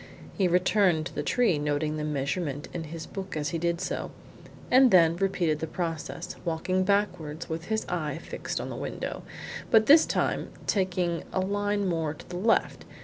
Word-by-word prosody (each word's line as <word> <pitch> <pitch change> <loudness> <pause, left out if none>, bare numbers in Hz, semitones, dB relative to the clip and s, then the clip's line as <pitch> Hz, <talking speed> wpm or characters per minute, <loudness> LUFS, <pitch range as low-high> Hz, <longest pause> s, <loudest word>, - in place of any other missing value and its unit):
He 190 -4 +2
returned 180 -2 +3
to - - -6
the - - -2
tree, 205 -2 +2
noting 150 +1 0
the 150 - -3
measurement 145 0 -2
in 170 -2 -4
his 160 +1 -7
book 190 -4 -6
as 150 -1 -1
he 165 - -2
did 170 0 0
so, 185 - -3 0.6
and 260 +1 +7
then 170 -5 +6
repeated 175 -4 0
the 160 - -3
process, 165 0 -4
walking 180 +2 0
backwards 180 -6 0
with 165 +1 -4
his 220 +2 -1
eye 160 -4 -2
fixed - - -5
on - - -5
the - - -5
window, - - -4 0.5
but 220 -1 +6
this 310 +5 +7
time - - 0 0.2
taking 180 -3 0
a - - 0
line 205 +1 0
more 160 -3 -1
to - - -13
the 175 - -5
left. 225 +5 +1
170 Hz, 180 wpm, -28 LUFS, 155-195 Hz, 0.6 s, and